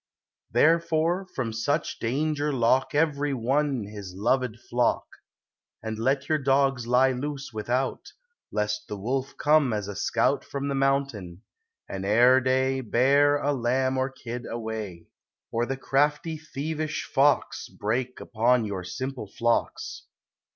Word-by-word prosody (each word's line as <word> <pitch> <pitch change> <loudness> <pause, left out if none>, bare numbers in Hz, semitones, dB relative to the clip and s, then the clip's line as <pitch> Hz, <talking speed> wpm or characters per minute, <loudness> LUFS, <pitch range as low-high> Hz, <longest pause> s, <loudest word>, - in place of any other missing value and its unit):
Therefore 165 +3 +2
from 120 -4 -2
such 145 +8 -1
danger 150 +5 0
lock 130 +1 +2
Every 145 -2 +1
one 135 +1 0
his 100 -3 -8
loved 120 +3 0
flock; 120 0 +1 0.8
And 110 0 -4
let 135 +4 0
your 155 -1 +2
dogs 135 -3 +2
lie 130 +2 +4
loose 135 0 -5
without, 120 +5 -2 0.4
Lest 105 0 -2
the 105 - -5
wolf 130 +6 -3
come 150 -3 +3
as 105 -2 -2
a 105 - -6
scout 120 +6 +1
From 140 0 -4
the - - -1
mountain, 135 -10 -1 0.4
and 95 -1 -5
ere 120 +6 +5
day, 130 +1 +1
Bear 140 +5 +3
a 145 0 0
lamb 130 +1 +1
or 130 0 0
kid 120 -2 -7
away; 110 -6 -5 0.5
Or 120 +1 0
the 135 - -2
crafty, 150 +4 +1
thievish 155 0 -4
fox, 140 0 +1
Break 125 +4 -2
upon 115 +1 +2
your 100 -3 -4
simple 125 +5 -5
flocks. 115 +4 -1
130 Hz, 135 wpm, -26 LUFS, 115-140 Hz, 0.8 s, ere